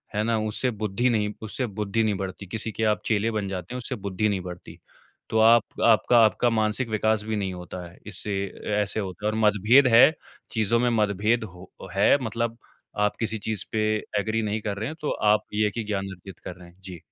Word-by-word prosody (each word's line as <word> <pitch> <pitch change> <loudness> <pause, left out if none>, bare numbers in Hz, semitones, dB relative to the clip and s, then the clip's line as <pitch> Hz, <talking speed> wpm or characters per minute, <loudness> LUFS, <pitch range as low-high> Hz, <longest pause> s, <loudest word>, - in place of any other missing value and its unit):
है 105 - +1
ना 115 0 +1
उससे 110 +4 -1
बुद्धि 110 +5 +1
नहीं 105 -2 0
उससे 110 +4 -3
बुद्धि 105 +2 -1
नहीं 105 -2 +1
बढ़ती। 95 +1 -6
किसी 110 +3 -4
के 110 - -3
आप 105 -1 +2
चेले 110 +1 +1
बन 105 -2 -2
जाते 95 +3 -5
हैं, - - -3
उससे 125 - -4
बुद्धि 100 +1 -1
नहीं 95 -2 -1
बढ़ती। 90 -1 -9 0.5
तो 110 - +1
आप 115 0 +4
आपका 115 +1 +5
आपका 120 +3 +2
मानसिक 110 +2 0
विकास 110 0 +1
भी 110 0 -2
नहीं 95 -2 -2
होता 90 0 -7
है। 85 - -16
इससे 100 0 -4 0.5
ऐसे 105 +2 -2
होता 95 +1 -5
है 105 - +2
और 110 - -3
मतभेद 110 +6 +5
है 130 +7 +8 0.4
चीज़ों 110 +1 +1
में 125 0 +2
मतभेद 105 +3 +1
हो 90 +1 -14 0.2
है 100 +8 +4
मतलब 115 +1 -2 0.5
आप 105 - -1
किसी 110 -1 -1
चीज़ 110 -3 -2
पे 110 - -1 0.4
एग्री 110 +2 -1
नहीं 105 +1 -2
कर 100 -1 -3
रहे 110 +3 -3
हैं 160 - -7
तो 150 - -2 0.2
आप 105 - +2
ये 105 0 +1
ही 115 - -1
ज्ञान 100 -2 -3
अर्जित 95 +2 -13
कर 90 - -8
रहे 90 -1 -14
हैं। 90 +2 -23
जी। 90 -3 -9
105 Hz, 215 wpm, -25 LUFS, 100-110 Hz, 0.5 s, है